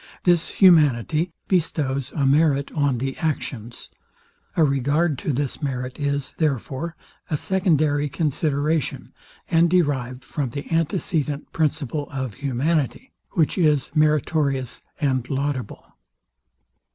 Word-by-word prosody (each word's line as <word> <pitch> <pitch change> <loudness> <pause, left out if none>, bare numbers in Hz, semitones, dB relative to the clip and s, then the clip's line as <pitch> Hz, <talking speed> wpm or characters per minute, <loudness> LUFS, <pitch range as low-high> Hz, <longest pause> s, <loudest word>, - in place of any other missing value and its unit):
This 175 -2 +3
humanity 160 - +4 0.2
bestows 145 -7 0
a 145 -4 0
merit 140 0 +3
on 145 -4 +1
the 135 +2 -3
actions. 125 -7 -4 0.7
A 165 - +5
regard 140 +2 +1
to - - -2
this 140 +2 -2
merit 130 -2 -3
is, 140 -2 -1
therefore, 150 +2 -1 0.3
a 155 - 0
secondary 155 -6 +1
consideration, 150 0 -1 0.3
and 170 +1 +4
derived 135 -8 0
from 135 0 -3
the 140 +7 -7
antecedent 160 -3 -1
principle 145 -2 -1
of 130 -5 -4
humanity, 145 - -1 0.2
which 165 0 +1
is 150 -6 +2
meritorious 150 -4 +1 0.2
and 130 -5 0
laudable. 135 -4 -3
145 Hz, 110 wpm, -23 LUFS, 135-160 Hz, 0.7 s, A